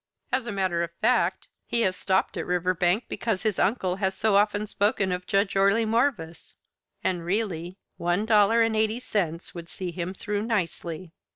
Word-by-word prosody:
As 255 -2 0
a - - -2
matter 185 -4 0
of 170 - -2
fact, 245 +3 +1 0.2
he 235 - +1
has 185 -4 +1
stopped 190 0 0
at - - -4
Riverbank 180 +3 +1
because 220 -5 -2
his 215 -4 0
uncle 185 -4 +1
had 190 -1 0
so 210 +1 +1
often 205 +1 +2
spoken 200 -2 0
of 180 0 -3
Judge 195 -1 +1
Orley 200 +4 +3
Morvis 220 -8 -1 0.5
and 175 -2 0
really, 180 -2 -2 0.2
one 175 +5 0
dollar 220 +1 +5
and 225 -1 +1
eighty 220 +2 +1
cents 190 -9 -2
would 170 -1 -8
see 185 -2 -5
him 175 +2 -4
through 205 +1 -3
nicely. 180 -6 -3
195 Hz, 175 wpm, -26 LUFS, 180-220 Hz, 0.5 s, dollar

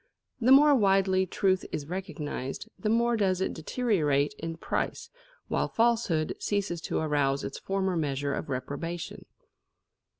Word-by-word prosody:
The 245 +2 +3
more 290 +2 +8
widely 195 -5 +3
truth 185 +1 +1
is 145 - -3
recognised, 155 - -5
the 215 - -1
more 235 +1 +3
does 190 -4 +1
it 190 - -1
deteriorate 155 - +1
in 165 0 -5
price, - - -3 0.4
while - - 0
falsehood 225 -9 +1
ceases 200 -5 -1
to - - 0
arouse 145 -3 +1
its - - -5
former 190 -1 -1
measure 140 -3 -1
of - - -4
reprobation. 145 +7 -5
185 Hz, 135 wpm, -28 LUFS, 150-205 Hz, 0.4 s, more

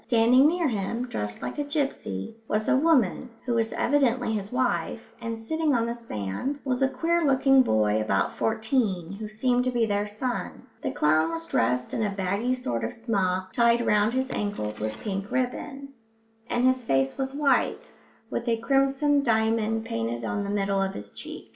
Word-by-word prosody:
Standing 245 +4 +5
near 340 0 +1
him, 230 +2 -2
dressed 105 - -4
like - - -4
a - - +1
gipsy, 275 - -3
was 215 +1 -1
a - - +4
woman, 265 - +2 0.2
who 245 - 0
was 225 -1 +1
evidently 255 -4 +1
his 205 -1 -3
wife, 250 -2 -1
and 230 -1 -3
sitting 305 +5 0
on 230 -1 +2
the 235 - -2
sand 230 - -4
was 255 -1 -1
a 270 - +5
queer 335 +5 0
looking 270 -1 +5
boy 110 - +2
about 100 -2 0
fourteen 220 -6 0
who 210 +2 -6
seemed 245 +3 +1
to 255 - 0
be 240 -2 +1
their 205 -1 0
son. 240 +4 -4 0.2
The - - -1
clown 155 +2 +2
was 165 0 -4
dressed 125 0 0
in - - -1
a 210 - +1
baggy 200 +6 -1
sort 120 - -3
of - - -3
smock, 190 -5 -1
tied 235 0 +3
round 210 +2 +3
his 260 0 -1
ankles 155 - -3
with 110 0 -3
pink 195 0 -3
ribbon, 270 +2 -3 0.6
and 240 +1 +1
his 255 -1 +3
face 135 -9 +1
was 270 0 -3
white, 285 -1 +1 0.4
with 235 - -3
a 230 -1 +2
crimson 275 +4 +2
diamond 225 -2 +1
painted 115 - -3
on 205 - -2
the 200 - -4
middle 200 -1 0
of 195 0 -1
each 100 0 -9
cheek. - - -8
225 Hz, 185 wpm, -26 LUFS, 195-260 Hz, 0.6 s, Standing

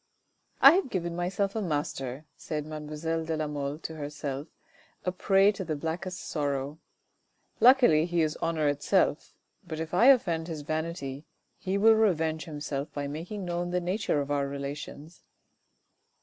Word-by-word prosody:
" - - -38
I - - +12
have 355 -3 +1
given 170 -5 -2
myself 195 +3 -1
a 220 - 0
master," 145 -5 -3
said 150 -2 -4
mademoiselle 155 +1 -3
de 160 0 -2
la 155 - -1
Mole 145 -1 -3
to 160 0 -7
herself, 145 -1 -5 0.6
a 180 - +1
prey 195 +2 +4
to 195 -2 -5
the 155 -3 -2
blackest 175 +5 -4
sorrow. 145 0 -3 0.4
" - - -43
Luckily 240 - +6
he 170 -2 +1
is 155 -1 -1
honour 160 -2 +1
itself, 145 +3 +1 0.3
but 160 -4 -6
if 160 +1 -5
I 225 +8 +5
offend 175 -12 +4
his 160 -3 -5
vanity, 155 -2 -4 0.3
he 190 +1 -2
will 220 +2 +6
revenge 165 -8 +1
himself 145 -2 -4
by 145 -1 -3
making 175 +7 -5
known 175 0 -2
the 180 0 0
nature 180 -2 0
of 145 0 -3
our 140 -1 +1
relations." 140 +3 -7
160 Hz, 165 wpm, -28 LUFS, 145-180 Hz, 0.6 s, I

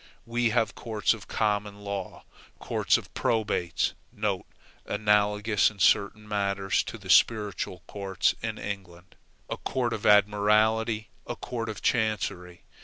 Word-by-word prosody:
We 120 0 +1
have 115 -1 +1
courts 110 -2 0
of 110 -3 -10
common 105 -1 -1
law, 100 -2 -5 0.3
courts - - +1
of - - -10
probates 105 -7 0 0.9
(analogous 105 0 +2
in 105 - -15
certain 100 +2 +2
matters 100 -2 0
to - - -6
the 100 -3 -12
spiritual 100 -2 +2
courts 100 -2 0
in - - -3
England), 95 -3 -7 0.3
a - - -4
court 120 -3 -1
of 105 - -2
admiralty 105 +2 +3 0.2
and - - -2
a - - -10
court 115 -2 -5
of 105 - -7
chancery. 100 -6 -1
105 Hz, 130 wpm, -27 LUFS, 100-110 Hz, 0.9 s, admiralty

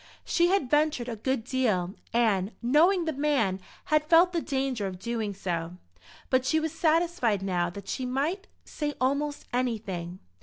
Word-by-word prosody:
She 345 0 +3
had 375 -7 +2
ventured 295 -3 +1
a 235 - -3
good 260 +2 -1
deal, 215 -8 0 0.2
and, 220 -4 +1
knowing 330 +8 +4
the 320 - -1
man, 265 -10 +1 0.3
had 305 -1 +2
felt 340 +3 +5
the 335 - 0
danger 265 -8 -1
of 185 -1 -6
doing 220 0 -3
so; 170 -2 -3 0.5
but 260 -1 +3
she 315 +4 +2
was 315 0 -3
satisfied 325 - +1
now 175 -2 0
that 195 +2 -10
she 255 - -3
might 305 +10 -1 0.2
say 295 -1 -4
almost 285 +3 -1
anything. 210 -8 -2
255 Hz, 160 wpm, -28 LUFS, 200-305 Hz, 0.5 s, felt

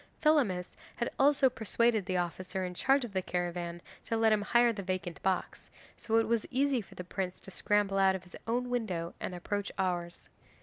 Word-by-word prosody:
Thelamis 250 - +2 0.2
had 235 - -2
also 275 -1 +5
persuaded 225 -3 +1
the 185 - 0
officer 185 +2 -2
in 180 - -5
charge 270 +7 +2
of 220 - -10
the 190 - +1
caravan 175 -1 -3 0.2
to 230 - -1
let 225 -1 +4
him 210 - +2
hire 235 +3 +4
the 205 - -5
vacant 185 -2 -4
box, 190 -1 -2 0.3
so 225 - -2
it 225 - +4
was 230 -1 0
easy 265 -1 +1
for 200 - -15
the 180 - -6
prince 180 0 -4
to 195 - -10
scramble 200 0 +1
out 190 -1 +5
of 185 - -6
his 180 - -12
own 245 +2 -1
window 185 -9 -2
and 180 - -4
approach 205 +3 -3
ours. 175 -2 -2
195 Hz, 200 wpm, -31 LUFS, 180-235 Hz, 0.3 s, also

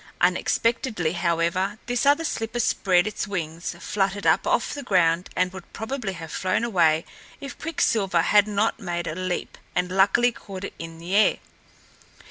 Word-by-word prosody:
Unexpectedly, 185 0 +1
however, 175 +3 0
this 245 +2 0
other 290 +3 +4
slipper 225 -4 -3
spread 190 -5 +2
its 210 -1 -3
wings, 170 -3 -4
fluttered 195 +1 -1
up - - +3
off - - +1
the 285 - -5
ground 180 -7 +2
and 185 0 +1
would 190 -2 -11
probably 220 -2 -4
have 165 -3 -8
flown 185 +5 0
away 165 -8 +2 0.3
if 275 -2 -7
Quicksilver 200 - +1
had 205 +2 +4
not 210 +2 0
made 175 -4 -3
a 155 - -3
leap 185 +1 -4 0.2
and 180 0 0
luckily 200 +6 +4
caught 195 -4 -9
it - - -5
in 165 0 -8
the 175 +4 -4
air. 215 - +4
190 Hz, 160 wpm, -24 LUFS, 175-220 Hz, 0.3 s, other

